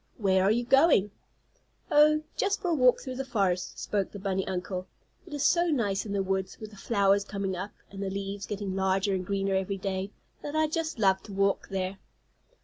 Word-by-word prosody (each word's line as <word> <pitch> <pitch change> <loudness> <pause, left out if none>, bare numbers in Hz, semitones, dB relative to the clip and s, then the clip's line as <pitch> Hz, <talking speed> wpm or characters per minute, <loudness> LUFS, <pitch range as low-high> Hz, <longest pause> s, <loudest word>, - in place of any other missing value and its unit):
"Where 190 -4 +3
are 195 - +4
you 240 +2 +1
going?" 270 - +5 0.8
"Oh, 305 +1 +5
just 405 +1 0
for 360 - -2
a - - +2
walk 255 -5 +4
through 255 -1 -6
the 270 - -2
forest," 195 -8 -1
spoke 200 -2 -2
the - - -8
bunny 190 -1 -2
uncle. 185 0 -3 0.4
"It 330 - -10
is 290 - -1
so 345 +2 +4
nice 215 - 0
in - - -5
the 200 -1 0
woods, 190 0 -2
with 215 -1 -8
the - - -13
flowers 200 -1 +2
coming 200 -2 -3
up, 190 +4 -5 0.2
and 195 0 -7
the 195 - -2
leaves 195 +1 -4
getting 200 -2 -4
larger 190 +1 +1
and 185 -1 -1
greener 195 +1 -1
every 190 +1 -1
day, 190 0 -3 0.3
that 295 +1 -5
I 315 0 +3
just 320 0 -2
love 190 -3 +3
to 205 - -10
walk 195 0 +1
there." 190 0 -3
200 Hz, 210 wpm, -28 LUFS, 190-245 Hz, 0.8 s, going